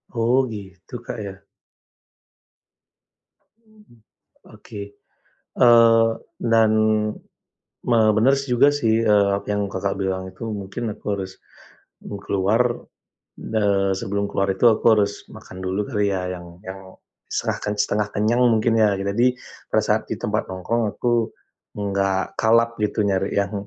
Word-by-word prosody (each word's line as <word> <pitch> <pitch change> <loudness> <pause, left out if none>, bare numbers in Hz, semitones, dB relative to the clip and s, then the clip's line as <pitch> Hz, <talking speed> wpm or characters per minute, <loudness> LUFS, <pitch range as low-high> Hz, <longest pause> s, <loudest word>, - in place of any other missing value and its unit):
Oh 115 +2 +2
gitu 95 +1 -11
Kak - - -5
ya. 95 -1 -8 2.3
Mhm, 215 - -22 0.6
oke. 105 -2 -10 0.8
Eee, 115 -2 +6 0.5
dan, 110 -1 +5 1.1
me 120 -2 +3 0.2
benar 130 +5 +4
si 135 -1 -5
juga 130 +4 +5
sih, 115 -5 +1
eee, 100 -2 +4 0.2
yang 105 -1 -1
Kakak 100 +1 -2
bilang 95 -1 -2
itu - - -22
mungkin 105 +2 -4
aku - - -22
harus, 95 -1 -7 0.6
bu 100 - -7
keluar, 100 +5 +1 0.8
eee, 100 -3 0
sebelum 100 +1 -2
keluar 100 -1 0
itu 120 - +2
aku 110 - +1
harus 100 -1 -1
makan 90 - -12
dulu 95 +2 -1
kali 105 -5 0
ya 90 -1 -2
yang 85 0 -12
yang 95 0 -7 0.5
setengah - - -2
kan, 105 - -1
setengah 105 0 0
kenyang 110 +4 +1
mungkin 115 0 +2
ya 105 -2 +4
gi 100 - -3
tadi, 115 +5 +2 0.4
pada - - +2
saat - - +1
di - - 0
tempat - - -1
nongkrong 95 +6 -2
aku, 120 -2 0 0.5
enggak 100 -1 -1
kalap 115 +1 +3
gitu 105 +1 -1
nyari 95 0 0
yang, 100 0 0
105 Hz, 135 wpm, -22 LUFS, 95-115 Hz, 2.3 s, Eee